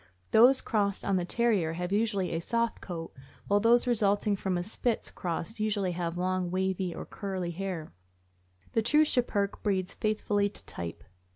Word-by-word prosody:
Those 250 +4 +7
crossed 200 -3 0
on 195 - +2
the 175 - -1
Terrier 200 -6 +1
have 180 +2 -4
usually 205 -3 +1
a 165 - -1
soft 230 +5 -1
coat, 165 -3 -6 0.3
while 205 0 +4
those 235 +3 +4
resulting 210 -3 +2
from 190 -2 -1
a 175 - -1
Spitz 225 +4 -1
cross 180 +5 -4
usually 205 -3 0
have 170 -1 -3
long 185 0 0
wavy 185 0 -1
or - - -6
curly 190 -4 -4
hair. 175 - -5 0.8
The 225 - +2
true 300 +7 +4
Schipperke 215 -8 0
breeds 190 -3 -1
faithfully 210 -1 0
to - - -7
type. 85 -1 -7
200 Hz, 165 wpm, -29 LUFS, 180-220 Hz, 0.8 s, Those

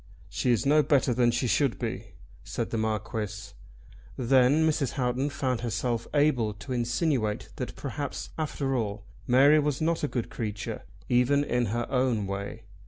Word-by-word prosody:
"She - - -1
is 120 0 +1
no 150 +2 +5
better 140 -3 +2
than 120 0 +3
she 120 +2 0
should 135 +1 +2
be," 110 -3 -5 0.3
said - - -4
the - - -1
Marquis. 110 -1 -3 0.7
Then 130 +5 +4
Mrs. 145 -5 0
Houghton 130 +2 0
found 130 -5 -2
herself 120 0 -2
able 125 -8 +2
to 130 +5 -6
insinuate 120 -2 0
that - - -5
perhaps, - - -5
after 140 -3 -2
all, 105 -3 -2 0.2
Mary 140 +5 +6
was 145 -2 0
not 165 0 0
a - - +2
good 120 -5 -3
creature, 105 -2 -4 0.3
even 125 +4 +3
in 125 -4 0
her 120 +3 -1
own 125 -5 +1
way. 100 +3 -5
125 Hz, 160 wpm, -28 LUFS, 110-140 Hz, 0.7 s, Mary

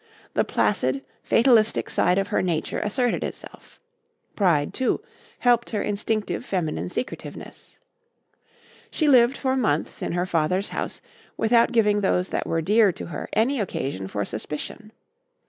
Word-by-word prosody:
The - - +2
placid, 130 +1 0 0.2
fatalistic 230 -3 +3
side 180 +1 +2
of 195 - 0
her - - +1
nature 170 -4 -1
asserted 245 +3 0
itself. - - -9 0.6
Pride, 170 -8 +2
too, 260 - 0 0.4
helped 240 -1 +2
her 210 -3 -1
instinctive 210 +2 -2
feminine 180 -8 -2
secretiveness. 245 - -7 1.1
She 310 - 0
lived 255 -1 +5
for 265 -1 0
months 215 - -1
in - - -2
her 175 +1 0
father's 180 +3 0
house - - -5 0.3
without 230 +2 +3
giving 210 -3 +3
those 185 -1 +1
that - - -2
were 165 0 0
dear 210 +2 +4
to - - -8
her 170 - -6
any 250 +5 +2
occasion 135 - -3
for 100 +1 -3
suspicion. 150 - -6
205 Hz, 140 wpm, -24 LUFS, 170-235 Hz, 1.1 s, lived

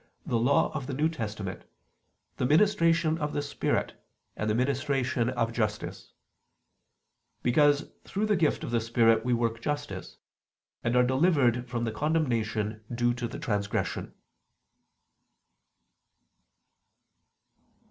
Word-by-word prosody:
the 115 - 0
Law 130 +5 +3
of 140 -4 -4
the 135 - -3
New 150 +3 +2
Testament, 105 - -5 0.7
the - - 0
ministration 165 -1 +3
of 150 0 -2
the 145 - 0
spirit 145 - -1 0.4
and 110 - -2
the 105 - +2
ministration 130 -1 0
of 115 -2 -1
justice: 110 -2 -3 1.3
because 145 +3 +3
through 205 +2 -2
the 210 -1 +2
gift 160 -4 +1
of - - -4
the 115 -1 +1
Spirit 115 -1 +3
we 125 - -1
work 115 -1 0
justice, 145 +1 -4 0.7
and 120 +1 0
are 125 - +6
delivered 130 -4 +2
from 120 -1 -2
the 115 - -1
condemnation 115 -6 -1
due 120 0 +1
to 120 0 -3
transgression." 105 -9 -2
125 Hz, 115 wpm, -28 LUFS, 115-150 Hz, 1.3 s, are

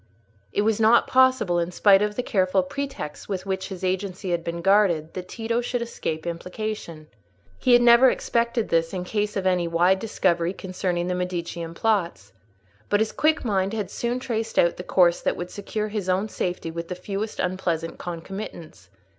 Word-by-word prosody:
It 205 - +1
was 220 0 +1
not 225 +2 +5
possible, 255 -9 +3
in 170 0 -1
spite 195 +1 +5
of 210 0 0
the 250 - -2
careful 190 -5 +2
pretexts 270 - -6
with 190 -2 -3
which 190 -1 -2
his 190 -2 -8
agency 185 0 -2
had 170 -1 0
been 170 0 -4
guarded, 185 -6 +3
that 180 -1 -6
Tito 230 +3 -2
should 245 0 -2
escape 160 -9 -4
implication: 170 -1 -5 0.5
he 250 - +3
had 240 0 +6
never 240 +2 +7
expected 235 -2 0
this 165 +1 +1
in 180 -1 -3
case 210 +2 -2
of 190 - -2
any 180 -2 +2
wide 175 +3 +3
discovery 180 -5 0
concerning 185 -2 -2
the 180 - -1
Medicean 175 -2 -4
plots. 170 - -1 0.6
But 205 - +3
his 220 0 +1
quick 310 -2 +1
mind 195 -2 0
had 205 -4 -3
soon 240 +1 -2
traced 225 -3 -3
out 170 - +3
the 180 - -6
course 175 -2 +3
that - - -1
would 175 +1 -5
secure 210 +1 -4
his 205 -3 -3
own 190 +4 +1
safety 175 -4 -3
with 170 +1 -5
the 180 - -4
fewest 200 +4 -5
unpleasant 175 -3 -2
concomitants. 175 -1 -7
190 Hz, 180 wpm, -24 LUFS, 175-215 Hz, 0.6 s, never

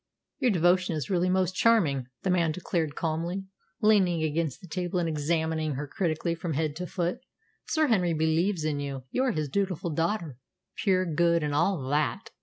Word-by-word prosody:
"Your 250 - +3
devotion 175 -2 +3
is 150 0 -4
really 180 0 +2
most 185 0 +1
charming," 170 - +3 0.2
the 190 - +1
man 170 -3 +2
declared 165 -3 -2
calmly, 170 +4 -2 0.4
leaning 190 -6 +4
against 155 -2 -1
the 180 - -12
table 180 +2 -2
and 175 -1 +1
examining 160 0 -1
her 145 +3 -3
critically 165 +1 -1
from 165 -1 -4
head 150 0 -1
to 180 +1 -4
foot. 175 -1 -2 0.5
"Sir 315 -1 +2
Henry 185 - +2
believes 160 +3 +1
in 155 -2 -1
you. 140 -2 -4
You 260 - +1
are 255 - +2
his 155 -7 -2
dutiful 180 +1 -1
daughter 165 - -2 0.4
pure, 185 -3 +2
good, 170 0 +2
and 150 -1 -1
all 145 -2 +1
that!" 150 +1 -1
170 Hz, 180 wpm, -28 LUFS, 155-185 Hz, 0.5 s, leaning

